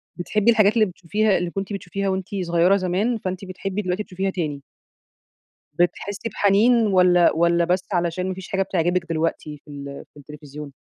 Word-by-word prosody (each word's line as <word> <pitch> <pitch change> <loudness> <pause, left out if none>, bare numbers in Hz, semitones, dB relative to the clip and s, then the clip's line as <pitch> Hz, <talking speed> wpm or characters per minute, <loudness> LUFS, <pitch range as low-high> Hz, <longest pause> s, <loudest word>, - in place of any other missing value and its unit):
بتحبي 205 +5 +2
الحاجات 215 -2 +4
اللي 220 -2 +4
بتشوفيها 195 +3 0
اللي 175 0 -2
كنتِ 195 +2 -4
بتشوفيها 195 0 -3
وأنتِ 190 0 -2 0.2
صغيرة 175 +3 +3
زمان، 195 +6 0
فأنتِ 185 -1 -5
بتحبي 195 +2 -4
دلوقتي 185 +2 -2
تشوفيها 190 +1 -3
تاني. 155 -7 -3 1.1
بتحسي 190 +6 -1
بحنين 215 +3 +3
والاّ 180 -3 +4
والاّ 170 +1 +3
بس 180 +2 0
علشان 175 +1 -1
مفيش 185 0 -7
حاجة 195 - 0
بتعجبِك 175 -1 0
دلوقتي 160 -2 -2
في 150 - -13
ال 140 -1 -8
في - - -19
التلفزيون؟ 150 0 -10
185 Hz, 160 wpm, -22 LUFS, 170-200 Hz, 1.1 s, الحاجات